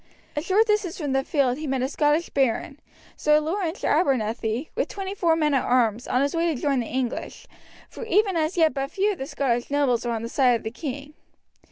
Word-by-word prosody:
A 295 Hz, -, -1 dB
short 390 Hz, +7 st, +3 dB
distance 420 Hz, -5 st, 0 dB
from 295 Hz, -6 st, -3 dB
the 270 Hz, 0 st, +1 dB
field 270 Hz, -2 st, +1 dB
he 310 Hz, -, -4 dB
met 265 Hz, -1 st, -1 dB
a -, -, +1 dB
Scottish 295 Hz, +3 st, +1 dB
baron, 270 Hz, +1 st, 0 dB, 0.4 s
Sir 300 Hz, 0 st, +3 dB
Laurence 335 Hz, +3 st, -3 dB
Abernethy, 235 Hz, -2 st, 0 dB
with -, -, -1 dB
twenty 390 Hz, -1 st, -5 dB
four 340 Hz, -5 st, +2 dB
men 305 Hz, -2 st, +1 dB
at 270 Hz, -, +2 dB
arms, 240 Hz, -2 st, +1 dB
on 255 Hz, +2 st, +2 dB
his 285 Hz, -, -1 dB
way 335 Hz, +1 st, +1 dB
to 310 Hz, -7 st, -1 dB
join 275 Hz, -2 st, +1 dB
the 235 Hz, -, -3 dB
English, 255 Hz, -1 st, -4 dB, 0.4 s
for -, -, -9 dB
even 420 Hz, -3 st, +2 dB
as 320 Hz, +2 st, 0 dB
yet 320 Hz, -2 st, +4 dB
but 275 Hz, -1 st, -3 dB
few 400 Hz, +5 st, +1 dB
of 385 Hz, -, -6 dB
the 265 Hz, -, -4 dB
Scottish 245 Hz, -5 st, -1 dB
nobles 280 Hz, -5 st, +1 dB
were 240 Hz, -, -2 dB
on 225 Hz, -1 st, -3 dB
the -, -, -3 dB
side 250 Hz, 0 st, +3 dB
of 230 Hz, -, -4 dB
the 220 Hz, -, -4 dB
king. 285 Hz, +2 st, -6 dB
285 Hz, 225 wpm, -24 LUFS, 250-330 Hz, 0.4 s, yet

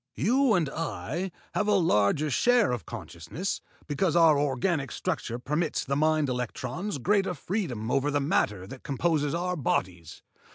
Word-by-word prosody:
You 245 Hz, -, +3 dB
and 170 Hz, -4 st, +2 dB
I 155 Hz, -, -3 dB, 0.2 s
have 210 Hz, -, 0 dB
a 210 Hz, -, +4 dB
larger 150 Hz, -, +2 dB
share 240 Hz, -, +3 dB
of 120 Hz, -3 st, -4 dB
consciousness, 85 Hz, -, -5 dB, 0.2 s
because 160 Hz, +3 st, 0 dB
our 165 Hz, -3 st, +6 dB
organic 145 Hz, +1 st, 0 dB
structure 155 Hz, -9 st, -3 dB
permits 150 Hz, +6 st, -1 dB
the 140 Hz, -, -1 dB
mind 155 Hz, 0 st, +2 dB
electrons 125 Hz, -, -3 dB
greater 190 Hz, -, +1 dB
freedom 130 Hz, -, -3 dB
over 140 Hz, +1 st, +2 dB
the 145 Hz, 0 st, +1 dB
matter 105 Hz, -, 0 dB
than 130 Hz, +7 st, -9 dB
composes 145 Hz, +2 st, 0 dB
our 180 Hz, +1 st, -1 dB
bodies. 90 Hz, -, -2 dB
150 Hz, 150 wpm, -28 LUFS, 125-180 Hz, 0.2 s, our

